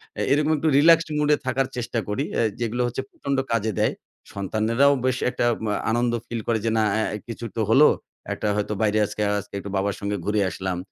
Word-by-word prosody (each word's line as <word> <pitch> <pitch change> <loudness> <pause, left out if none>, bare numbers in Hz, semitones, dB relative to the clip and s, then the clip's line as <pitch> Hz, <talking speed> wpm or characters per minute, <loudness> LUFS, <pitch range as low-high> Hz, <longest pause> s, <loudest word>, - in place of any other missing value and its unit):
অ্যা - - -2
এরকম 150 +2 +3
একটু 160 - -1
relaxed 165 +2 +5
mood 150 0 +1
এ - - -8
থাকার 130 +1 +1
চেষ্টা 120 -1 -2
করি 105 +7 -1 0.2
আ - - +3 0.2
যেগুলো 120 +1 -1
হচ্ছে 120 +2 -3
প্রচন্ড 140 -1 -3 0.2
কাজে 110 -1 0
দেয়। - - +2 0.4
সন্তানেরাও 110 +8 +2
বেশ 130 0 +1
একটা 125 - -1 0.2
ম্যা 105 -1 0 0.2
আনন্দ 120 +1 +1 0.2
ফিল 115 -1 -4
করে 115 -1 +1
যে - - +2
না 110 - +3 0.2
আ - - +1 0.2
কিছু 115 0 -6
তো 115 - 0
হলো। 140 +7 +7 0.5
একটা - - -3
হয়তো 105 0 -1
বাইরে 110 -1 +2
আজকে, 105 +1 -5 0.2
আজকে 100 0 -12
একটু 100 - -7
বাবার 100 0 0
সঙ্গে 100 0 -2
ঘুরে 105 0 +1
আসলাম। 95 -1 -3
115 Hz, 210 wpm, -24 LUFS, 105-135 Hz, 0.5 s, হলো